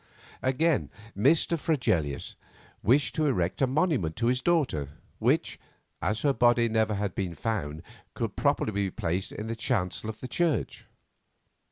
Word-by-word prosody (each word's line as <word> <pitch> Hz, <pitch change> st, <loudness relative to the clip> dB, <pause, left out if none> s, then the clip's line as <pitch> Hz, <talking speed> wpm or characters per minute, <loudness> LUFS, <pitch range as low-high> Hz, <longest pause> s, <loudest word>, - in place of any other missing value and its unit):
Again, 140 Hz, +5 st, +1 dB, 0.3 s
Mr. 160 Hz, -, +3 dB
Fregelius 85 Hz, -, 0 dB, 0.5 s
wished 135 Hz, +6 st, +3 dB
to 155 Hz, -1 st, +1 dB
erect 95 Hz, -7 st, 0 dB
a 135 Hz, -, +4 dB
monument 130 Hz, -, +1 dB
to -, -, -1 dB
his 125 Hz, +2 st, +2 dB
daughter, 135 Hz, -, +1 dB, 0.3 s
which, -, -, +1 dB, 0.4 s
as 105 Hz, +1 st, -1 dB
her 140 Hz, -2 st, +3 dB
body 120 Hz, 0 st, +4 dB
never 110 Hz, -1 st, +1 dB
had 100 Hz, -2 st, -2 dB
been 90 Hz, -4 st, -3 dB
found, 85 Hz, -9 st, -3 dB, 0.3 s
could -, -, -3 dB
properly -, -, +1 dB
be 100 Hz, -1 st, 0 dB
placed 90 Hz, +1 st, -2 dB
in 105 Hz, -, -6 dB
the 115 Hz, +1 st, -3 dB
chancel 110 Hz, -3 st, -1 dB
of 110 Hz, 0 st, -6 dB
the 130 Hz, -, -6 dB
church. 165 Hz, +3 st, -1 dB
115 Hz, 150 wpm, -28 LUFS, 95-135 Hz, 0.5 s, a